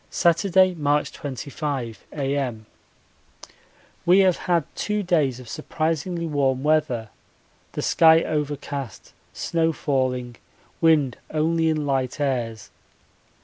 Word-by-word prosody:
Saturday, 185 +2 +3
March 150 -2 0
25, 135 -3 -5
A.M. 135 -6 -2 1.4
We 185 +3 +6
have 185 -2 +3
had 170 -3 +3
two 210 0 -1
days 150 -9 +1
of 125 - -12
surprisingly 165 +4 -2
warm 135 -4 0
weather, 150 -8 +1 0.6
the - - -3
sky 160 0 +5
overcast, 145 - -4 0.2
snow 165 -1 0
falling, 130 -5 -1 0.4
wind 150 -6 +3
only 160 +1 +1
in 155 -2 0
light 135 -1 -1
airs. 120 -6 -2
150 Hz, 105 wpm, -24 LUFS, 130-165 Hz, 1.4 s, We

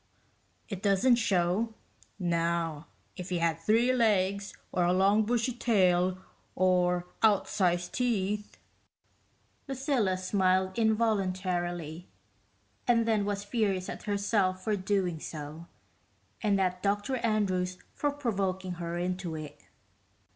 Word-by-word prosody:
It 195 -4 -6
doesn't 205 +5 +4
show. 210 +1 +1 0.4
Now 170 -3 -1 0.3
if 185 0 -7
you 175 - 0
had 165 -1 +1
three 225 +9 +3
legs, 200 -4 +1 0.2
or 180 - +1
a 175 +1 +3
long 200 +3 +4
bushy 240 +2 0
tail, 185 -6 +2 0.4
or 180 -1 +2 0.2
outsized 185 -4 +2
teeth...." 210 -4 -1 1.1
Lucilla 265 -8 0
smiled 185 0 +1
involuntarily, 185 -6 0 0.8
and 230 -2 +3
then 215 -3 +2
was 200 -1 -2
furious 205 -4 -1
at - - -6
herself 200 -2 +1
for 215 +1 +1
doing 185 -4 -1
so 155 +2 -7 0.7
and 205 -3 +2
at 185 -1 0
Dr 205 +7 0
Andrews 190 -6 0 0.2
for 290 - 0
provoking 195 -9 -2
her 170 0 -3
into 180 -1 -3
it. 155 -2 -9
190 Hz, 110 wpm, -29 LUFS, 180-215 Hz, 1.1 s, doesn't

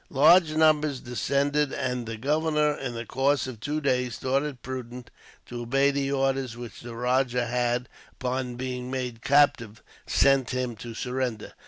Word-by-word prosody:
Large 155 +4 +5
numbers 155 -3 +3
deserted, 140 +4 0
and 125 -3 -3
the 115 -1 -5
governor, 150 +3 +1
in 130 -4 -5
the 115 +1 -5
course 140 +4 +1
of 130 -4 -7
two 150 +7 -2
days, 125 -5 0
thought 135 +1 +1
it 145 -4 -6
prudent 125 -1 -7 0.3
to 120 0 -7
obey 135 +4 +2
the 140 0 -1
orders 135 -3 0
which 120 -5 -9
the 120 -1 -8
rajah 125 0 +1
had, 120 +1 0 0.3
upon 125 -1 -3
being 125 0 -4
made 125 -3 -4
captive, 135 -6 +2 0.2
sent 135 -2 +3
to - - -4
him 125 -2 -2
to 115 +2 -8
surrender. 125 -2 -3
130 Hz, 165 wpm, -26 LUFS, 120-140 Hz, 0.3 s, Large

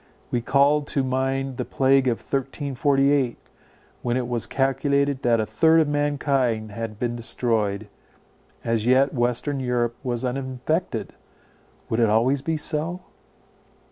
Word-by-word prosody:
We 120 - 0
called 145 +4 +3
to 135 - 0
mind 135 0 -1
the - - -1
plague 135 0 +2
of 120 -2 +1
1348, 135 -1 0 0.6
when 120 0 0
it 125 -2 -2
was 120 -2 -2
calculated 140 0 +1
that 120 -2 +2
a 110 - +1
third 160 +7 +4
of 155 - +3
mankind 135 -6 0
had 110 0 -5
been 120 +1 -2
destroyed. 110 -4 -1 0.8
As 115 -1 0
yet 130 +2 +4
western 125 +3 0
Europe 120 -2 0
was 125 -1 -2
uninfected; 130 +6 -2 0.7
would 115 - -1
it 115 -2 +4
always 125 +6 +2
be 160 +3 -1
so? 160 +4 -2
130 Hz, 135 wpm, -24 LUFS, 120-140 Hz, 0.8 s, third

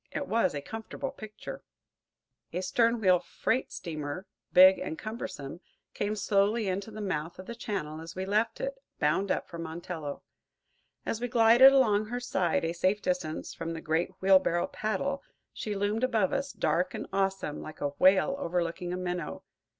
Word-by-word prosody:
It 285 - -3
was 215 -8 +2
a 145 - -4
comfortable 225 - -5
picture. 215 -5 -9 0.9
A 180 - -2
stern 230 +4 +2
wheel 185 -4 +5
freight 180 +8 -1
steamer, 155 0 -5 0.3
big 185 +1 +8
and 160 - -4
cumbersome, 185 - -6 0.3
came 205 +1 -1
slowly 205 +2 +2
into 195 +3 -2
the 215 0 -7
mouth 165 -5 -3
of 185 - -9
the 235 - -6
channel 190 -10 -4
as 165 0 -9
we 185 +1 -3
left 215 - +1
it, - - -3 0.2
bound 195 0 +1
up, - - 0
for 170 - -8
Montello. 160 -2 -5 0.8
As 225 - -2
we 245 - 0
glided 240 +2 +7
along 215 -6 +4
her 245 +2 -3
side, 185 -9 0
a 165 - -1
safe 185 +4 +1
distance 180 -5 -2
from 165 0 -4
the 165 - -5
great 160 +1 0
wheelbarrow 185 -3 +4
paddle, 275 +7 -2 0.3
she 210 -1 -4
loomed 205 +4 0
above 225 -7 +2
us, 275 0 -1
dark 175 +4 0
and - - -4
awesome, 195 -6 -1
like 155 - -9
a 145 - 0
whale 190 - +4
overlooking 175 -3 -2
a - - -2
minnow. 180 -1 -4
190 Hz, 170 wpm, -29 LUFS, 170-225 Hz, 0.9 s, big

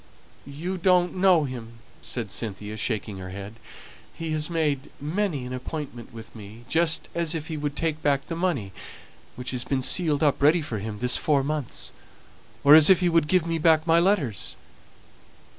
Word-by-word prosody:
"You 170 +7 -5
don't 180 0 +3
know 185 -4 +4
him," 120 -4 -7 0.3
said 115 -6 -4
Cynthia, 105 0 -5
shaking 110 -2 -3
her 95 0 -7
head. 100 +4 -9 0.5
"He 165 -1 -5
has 155 0 -1
made 150 -4 -1
many 155 -2 -2
an 125 - -6
appointment 130 -2 -6
with 115 -1 -11
me, 110 +2 -11
just 160 +3 +1
as 170 -1 -1
if 160 0 -5
he 160 - -3
would 145 -1 -3
take 160 -2 -2
back 140 -1 +1
the 165 - -5
money 165 - -1 0.6
which 125 0 -3
has 125 -2 -3
been 135 -2 -1
sealed 155 -1 +1
up 145 -2 +2
ready 155 +3 +4
for 115 -8 -4
him 105 +1 -5
this 125 +3 +3
four 145 -3 +1
months; 150 -2 -3 0.7
or 145 +1 +8
as 155 -1 +9
if 190 - +6
he 180 - +3
would 165 -3 +2
give 180 0 +2
me 165 -1 -1
back 160 0 +4
my 165 0 +4
letters. 170 - 0
145 Hz, 180 wpm, -25 LUFS, 120-165 Hz, 0.7 s, as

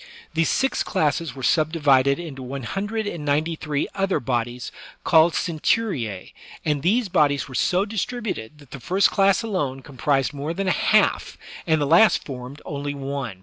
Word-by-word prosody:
These 165 0 +1
six 270 0 +1
classes 150 -2 -1
were 130 - -8
subdivided 145 -4 +3
into 155 -6 -7
one 130 +1 -6
hundred 205 - -3
and 170 -7 -5
ninety 150 +3 0
three 150 -2 -2
other 195 -1 0
bodies 120 0 -3 0.3
called 160 0 +5
centuria^ 155 - -1 0.3
and 150 -3 0
these 215 - +2
bodies 150 -6 +2
were 135 - -11
so 180 +9 +1
distributed 210 - -4
that 145 -3 -18
the 140 - -7
first 185 +9 +2
class 195 +2 +3
alone 145 -12 -2
comprised 135 0 0
more 145 +4 -4
than 195 +1 -2
a - - +3
half, - - +2 0.3
and 160 -1 +3
the 145 - +1
last 170 +9 +5
formed 130 +1 -8
only 145 0 -4
one. 135 -7 -5
150 Hz, 165 wpm, -23 LUFS, 135-185 Hz, 0.3 s, called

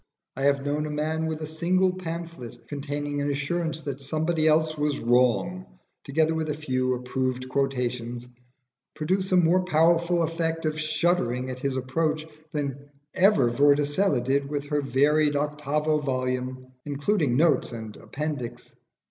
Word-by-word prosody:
I 135 - -5
have 140 0 +2
known 150 +1 -1
a - - -5
man 155 +2 -1
with 160 0 -3
a - - -2
single 180 +4 +1
pamphlet 165 -10 -7
containing 145 +1 -3
an 145 - 0
assurance 160 +3 -2
that 140 -2 -5
somebody 155 +3 0
else 155 0 +3
was 150 -1 0
wrong, 125 +10 +2 0.4
together 155 +3 +1
with 160 -1 -2
a 150 - -1
few 130 -4 0
approved 130 0 -2
quotations, 125 -3 -2 0.7
produce 185 +5 -1
a 185 - +5
more 180 +2 +4
powerful 170 0 +3
effect 165 0 -1
of 155 0 -1
shuddering 150 -6 0
at 130 - -6
his 135 0 -1
approach 155 +4 -1 0.3
than 140 -1 -4 0.2
ever 185 - +4
Vorticella 145 +4 +3
did 140 +2 0
with 145 -1 -3
her 150 -1 +1
varied 145 +3 +3
octavo 150 +1 0
volume, 130 -1 -3
including 145 - 0
notes 150 -5 +3
and 110 -3 -7
appendix. 130 -5 -5
145 Hz, 145 wpm, -26 LUFS, 130-160 Hz, 0.7 s, a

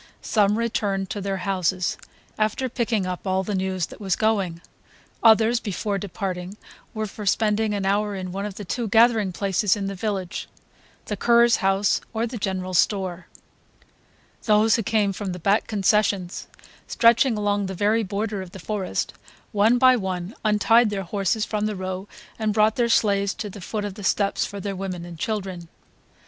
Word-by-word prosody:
Some 210 -1 +2
returned 200 -4 -1
to 205 - -3
their 195 0 -2
houses, 185 -1 0 0.4
after 215 +5 0
picking 230 -5 -1
up 185 +1 -5
all 190 0 +1
the 205 - -3
news 190 -2 -1
that - - -13
was 190 -3 0
going; 200 -6 0 0.6
others, 225 +1 +5
before 200 -1 -3
departing, 190 0 -5 0.4
were 215 0 -1
for 210 0 -7
spending 215 +1 +1
an 195 -1 -2
hour 205 +1 +1
in 185 -1 -5
one 195 +2 -3
of 200 - -8
the 205 - -7
two 235 +5 -2
gathering 225 -2 +4
places 195 +2 +1
of 200 -2 -3
the 195 - -3
village; 195 -2 -3 0.6
the 210 - -3
curé's 235 +3 +4
house 195 0 +2
or 225 +1 +1
the 235 0 -6
general 185 -2 -3
store. 185 -1 0 1.2
Those 215 0 +4
who 230 - 0
came 210 -2 +1
from 190 -1 -4
the - - -6
back 200 +5 +1
concessions, 200 -3 +1 0.4
stretching 235 +1 +4
along 205 -1 0
the 190 - -5
very 210 +4 +2
border 205 0 -3
of 185 -1 -10
the - - -8
forest, 195 0 -3 0.4
one 215 +3 +4
by 255 0 +6
one 190 -2 -3
untied 220 +2 +4
their 200 -2 -3
horses 200 +3 -1
from 210 -1 -1
the 215 - -3
row 185 +1 -5 0.3
and 215 -2 0
brought 215 0 +4
their 240 -1 +1
sleighs 200 -3 +2
to 210 -3 -5
the 200 - -10
foot 210 +3 -3
of 205 - -4
the 205 +1 -10
steps 200 +1 +1
for 200 - -7
their 195 0 -4
women 185 -2 -5
and 170 -2 -10
children. 190 -4 -3
205 Hz, 180 wpm, -24 LUFS, 190-215 Hz, 1.2 s, by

